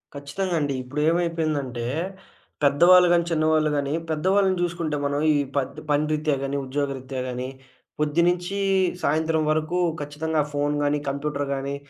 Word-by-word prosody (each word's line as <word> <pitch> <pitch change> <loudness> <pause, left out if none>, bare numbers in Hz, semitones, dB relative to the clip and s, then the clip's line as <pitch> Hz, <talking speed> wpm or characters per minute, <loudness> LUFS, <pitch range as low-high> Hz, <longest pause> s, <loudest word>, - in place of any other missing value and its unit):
ఖచ్చితంగా 145 +6 -3
అండి. 145 -2 -1
ఇప్పుడు 140 +4 -4
ఏమైపోయిందంటే, 155 -8 -1 0.8
పెద్దవాళ్ళు 175 +6 +6
గానీ, 170 -1 +3
చిన్నవాళ్ళు 155 -1 +2
గాని, 140 0 -1 0.2
పెద్దవాళ్ళని 190 +4 +2
చూసుకుంటే 170 -3 -1
మనం 140 0 0
ఈ - - +1 0.2
పత్ 135 - -2
పని 145 +1 +2
రీత్యా 155 -1 +1
గాని, 140 +1 -2
ఉద్యోగరీత్యా 135 -1 -3
గాని 125 +1 -4 0.5
పొద్దునుంచి 175 +5 +1 0.5
సాయంత్రం 160 +1 +1
వరకు 155 +3 0 0.2
ఖచ్చితంగా 150 +2 -1
ఫోను 145 +1 0
గానీ, 145 +1 +1
కంప్యూటరు 140 0 -2
గానీ, 135 +1 -3
150 Hz, 130 wpm, -24 LUFS, 140-165 Hz, 0.8 s, పెద్దవాళ్ళు